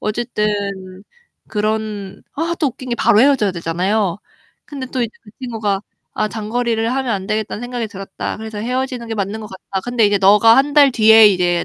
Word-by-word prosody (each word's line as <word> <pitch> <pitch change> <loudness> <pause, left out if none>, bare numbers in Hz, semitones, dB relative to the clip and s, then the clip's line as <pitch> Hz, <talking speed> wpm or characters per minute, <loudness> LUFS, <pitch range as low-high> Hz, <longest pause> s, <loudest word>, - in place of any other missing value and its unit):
어쨌든 215 0 -2 1.0
그런 210 -2 -3
아 335 +3 -1
또 295 - +1
웃긴 255 +1 -10
게 - - +1
바로 215 -2 +3
헤어져야 260 -8 +3
되잖아요. 180 +3 -1 0.5
근데 275 -3 -7
또 255 0 -4
이제 230 - -2
그 210 - -16
친구가 215 -6 -2 0.3
'아 215 - 0
장거리를 225 +1 -2
하면 260 -3 -1
안 190 -1 -3
되겠다는 215 0 -3
생각이 245 -1 -4
들었다. 195 -2 -6
그래서 220 -1 -7
헤어지는 250 +1 -3
게 225 - -3
맞는 205 +1 -3
것 215 - -7
같다. 190 0 -6
근데 245 -3 +2
이제 205 - +2
너가 210 +4 +6
1 280 +2 +2
달 285 -2 +7
뒤에 220 -2 +7
이제 175 -2 +1
220 Hz, 365 characters per minute, -18 LUFS, 205-245 Hz, 1.0 s, 달